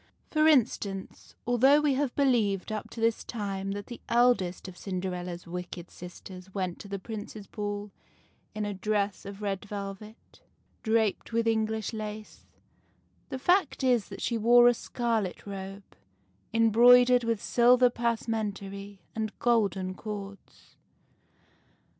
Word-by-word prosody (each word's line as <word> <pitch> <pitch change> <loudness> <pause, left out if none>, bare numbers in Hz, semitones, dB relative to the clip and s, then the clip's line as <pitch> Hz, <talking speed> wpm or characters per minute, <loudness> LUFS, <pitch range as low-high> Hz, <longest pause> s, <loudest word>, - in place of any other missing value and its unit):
For 310 0 +4
instance, 215 -9 0
although 260 +4 +5
we 300 -2 +2
have 265 -1 -1
believed 225 -8 +1
up 215 0 -4
to 230 - -9
this 225 0 +1
time 195 -3 -4
that 205 0 -6
the 240 - -9
eldest 235 -7 +2
of 185 - -9
Cinderella's 180 -2 -4
wicked 180 0 -7
sisters 180 +1 -11
went 185 -3 -2
to - - -9
the 200 0 -4
Prince's 210 0 -7
ball 205 0 -5 0.6
in 215 0 -2
a 205 - -3
dress 200 0 -1
of 200 +1 -8
red 195 -2 -2
velvet, 205 +1 -8 0.4
draped 220 0 0
with 230 0 +1
English 220 -1 0
lace, 215 0 -7 0.8
the 265 - -4
fact 355 +1 +2
is 245 -5 +2
that - - -8
she 235 -2 0
wore 240 +2 +7
a 245 - +6
scarlet 230 -5 -2
robe, 195 0 -7 0.7
embroid 235 +2 +6
ered 250 -1 +4
with 230 -2 0
silver 245 +2 +4
passementerie 205 -4 -3
and 220 -1 -3
golden 195 -6 +1
cords. 200 0 -9
215 Hz, 135 wpm, -28 LUFS, 195-235 Hz, 0.8 s, wore